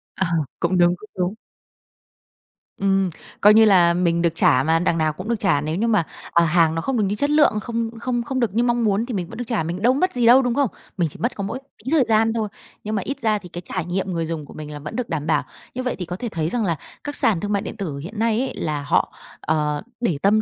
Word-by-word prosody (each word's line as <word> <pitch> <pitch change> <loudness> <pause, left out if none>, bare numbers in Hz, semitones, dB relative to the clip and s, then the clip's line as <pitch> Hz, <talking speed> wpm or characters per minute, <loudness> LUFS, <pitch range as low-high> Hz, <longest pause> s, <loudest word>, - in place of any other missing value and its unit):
À, 190 - 0 0.3
cũng 180 +2 +1
đúng, 175 0 +4
cũng 215 - -15
đúng. 185 +3 -1 1.4
Ừm, 195 -1 +2 0.3
coi 210 +1 +8
như 220 +1 +7
là 175 -5 +5
mình 170 -1 +1
được 170 -1 +1
trả 130 -5 +4
mà, 160 +3 +2
đằng 170 -1 +1
nào 155 -1 +1
cũng 185 +8 -7
được 235 -2 0
trả 150 -8 +2
nếu 155 +1 -2
như 225 +6 0
mà, 210 -6 +3 0.3
à, 170 - +4
hàng 165 -1 +3
nó 165 - -1
không 265 +3 -1
được 215 - +2
như 200 +1 0
chất 285 +7 0
lượng, 295 -8 +4
không 230 0 -2
không 240 -1 -1
không 260 +1 -3
được 230 -6 0
như 235 +2 +2
mong 240 -1 +1
muốn 210 +1 +1
thì 245 - -5
mình 180 -4 -2
vẫn 225 - -9
được 245 - -3
trả, 220 -8 0
mình 175 +4 -4
đâu 245 +3 +4
mất 365 +7 +1
gì 245 -2 +1
đâu, 245 +3 +8
đúng 245 -2 0
không? 280 -6 +2 0.3
Mình 170 -3 +1
chỉ - - -11
mất 240 +2 -1
có 200 - -4
mỗi 230 +6 -4 0.3
tí 260 - -3
thời 315 -4 +5
gian 225 0 +3
thôi. 220 -2 -1 0.4
Nhưng 215 +1 -3
mà 200 - 0
ít 280 +8 -4
ra 215 -2 +2
thì 180 -3 -12
cái 175 - -7
trải 180 -1 -4
nghiệm 185 +1 -2
người 165 -1 -1
dùng 160 -2 -4
của - - -13
mình 150 -1 -8
là 145 - -7
vẫn 150 +1 -7
được 250 -4 -3
đảm 155 -2 -3
bảo. 160 - +2 0.3
Như 255 +1 -3
vậy 250 - -1
thì 180 - -5
có 175 - -5
thể 235 +5 -4
thấy 160 -4 -2
rằng 235 0 -1
là 170 -4 0 0.3
các 290 0 -4
sàn 215 -10 +2
thương 205 +4 -3
mại 200 -1 +1
điện - - -7
tử 160 -8 -4
hiện 195 +10 -7
nay 225 -1 +2
ấy, 265 - -2
là 150 -2 -2
họ, - - +1 0.3
ờ, 150 -2 0 0.2
để 175 -11 +1
tâm 210 +2 +4
195 Hz, 280 wpm, -22 LUFS, 170-230 Hz, 1.4 s, coi